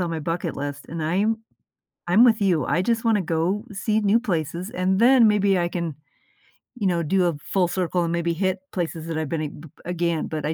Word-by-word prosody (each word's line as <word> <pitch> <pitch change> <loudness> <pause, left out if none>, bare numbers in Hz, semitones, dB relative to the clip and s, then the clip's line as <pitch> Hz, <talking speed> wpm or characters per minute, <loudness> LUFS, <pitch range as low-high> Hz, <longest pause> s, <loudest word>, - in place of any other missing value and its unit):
on 175 -2 -1
my 165 -1 -3
bucket 165 +3 -3
list, 145 0 -5
and 165 -1 -5
I'm 200 +8 +1 0.7
I'm 200 +7 +6
with 225 -2 +4
you, 180 -6 +2
I 175 - +1
just 230 +3 0
wanna 220 -3 +3
go 175 +5 -1
see 215 +2 0
new 210 +2 +3
places, 175 - -3
and 185 0 0
then 240 -2 +6
maybe 200 -2 +3
I 175 0 0
can, 170 -3 -3 0.8
you 210 -5 -1
know, 170 -2 +1
do 185 +4 +2
a 170 -3 +1
full 185 +3 0
circle 180 0 -1
and 170 - -1
maybe 170 0 0
hit 185 +2 -1
places 165 -2 -4
that 165 -1 -3
I've 160 -2 -2
been 155 -2 -4
b 160 - -12 0.2
again; 170 -2 -1
but 155 -2 -4
I 155 - 0
175 Hz, 215 wpm, -23 LUFS, 165-200 Hz, 0.8 s, I'm